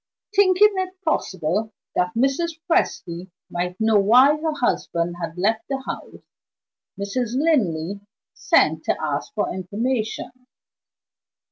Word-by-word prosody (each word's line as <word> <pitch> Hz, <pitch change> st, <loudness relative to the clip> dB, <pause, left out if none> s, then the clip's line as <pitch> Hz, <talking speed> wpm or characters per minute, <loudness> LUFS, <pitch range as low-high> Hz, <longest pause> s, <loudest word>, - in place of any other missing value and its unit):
Thinking 405 Hz, +1 st, +5 dB
it 375 Hz, 0 st, -3 dB
possible 200 Hz, -, -1 dB, 0.2 s
that 180 Hz, +4 st, 0 dB
Mrs. 295 Hz, +7 st, 0 dB
Presty 185 Hz, -, 0 dB, 0.2 s
might 180 Hz, +1 st, -3 dB
know 220 Hz, -1 st, +4 dB
why 250 Hz, +9 st, +6 dB
her 315 Hz, +1 st, -2 dB
husband 175 Hz, -, -1 dB
had 165 Hz, 0 st, -5 dB
left 220 Hz, +4 st, 0 dB
the 270 Hz, -1 st, -1 dB
house, -, -, -7 dB, 0.8 s
Mrs. 225 Hz, +4 st, -2 dB
Linley 200 Hz, -, +1 dB, 0.3 s
sent -, -, +2 dB
to -, -, +1 dB
ask -, -, -2 dB
for -, -, -1 dB
information. 220 Hz, +7 st, -2 dB
225 Hz, 115 wpm, -23 LUFS, 180-300 Hz, 0.8 s, why